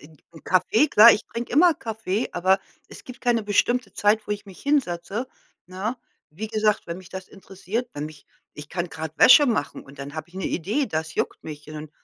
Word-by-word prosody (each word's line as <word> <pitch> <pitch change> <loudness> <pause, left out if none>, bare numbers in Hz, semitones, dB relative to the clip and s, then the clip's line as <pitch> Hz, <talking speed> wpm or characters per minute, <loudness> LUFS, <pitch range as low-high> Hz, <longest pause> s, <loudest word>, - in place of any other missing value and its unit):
'n 155 +1 -17 0.2
'n 160 - -15
Kaffee 185 - +3
klar, 225 +3 +9
ich 210 - -2
trinke 235 +1 -6
immer 335 +3 +5
Kaffee, 220 -2 -3
aber 190 +2 +2 0.3
es - - -12
gibt 250 -1 -11
keine 240 -3 +1
bestimmte 240 +5 +1
Zeit, 210 +1 +2
wo - - -8
ich 205 0 -6
mich 190 - -13
hinsetze, 230 -5 -1 0.4
ne? 195 +7 -4 0.3
Wie 195 +9 -6
gesagt, 215 -1 0
wenn 170 +1 -5
mich 185 -2 -13
das 190 0 -8
interessiert, 195 +4 -5
wenn 145 +1 -4
mich 155 -2 -14 0.3
ich 150 0 -10
kann 175 0 -3
grad 160 -1 -7
Wäsche 290 +3 +8
machen 225 - -2
und 140 0 -16
dann 140 +1 -7
habe 155 +1 -6
ich 175 - -23
'ne 190 - -4
Idee, 215 - -1
das 160 -4 -4
juckt - - -3
mich 150 -2 -9
und 155 - -9
dann 150 0 -8
195 Hz, 215 wpm, -24 LUFS, 160-225 Hz, 0.4 s, klar